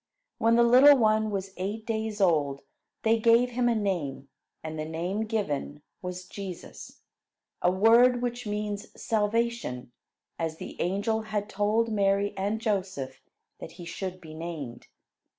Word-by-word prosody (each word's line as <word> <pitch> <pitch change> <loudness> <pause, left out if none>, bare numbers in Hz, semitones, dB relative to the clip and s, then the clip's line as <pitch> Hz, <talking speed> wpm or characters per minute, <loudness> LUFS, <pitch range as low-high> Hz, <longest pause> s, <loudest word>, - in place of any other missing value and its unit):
When 230 +1 +4
the 235 - +6
little 260 +4 +8
one 215 -2 +3
was 195 -2 -4
eight 205 +4 -4
days 220 -2 -2
old, 150 -7 +2 0.4
they 225 0 +3
gave 235 +2 +4
him 240 0 +1
a 235 - +2
name; 170 -10 -2 0.3
and 155 0 -5
the - - -1
name 175 +7 -2
given 150 -9 -3 0.2
was 180 -1 -6
"Jesus," 190 -2 -9 0.6
a 180 - +4
word 230 +6 +5
which 245 -1 -3
means 210 0 -3
"salvation," 220 - -1 0.5
as 160 -1 -2
the - - -7
angel 200 +5 0
had 210 -1 -3
told 210 +2 +1
both 225 - -4
Mary 200 0 +2
and 200 +3 -1
Joseph 190 - -2 0.4
that - - -9
he 175 0 -10
should 185 +2 -5
be 160 -3 -11
named. 155 -7 -7
205 Hz, 150 wpm, -28 LUFS, 175-225 Hz, 0.6 s, little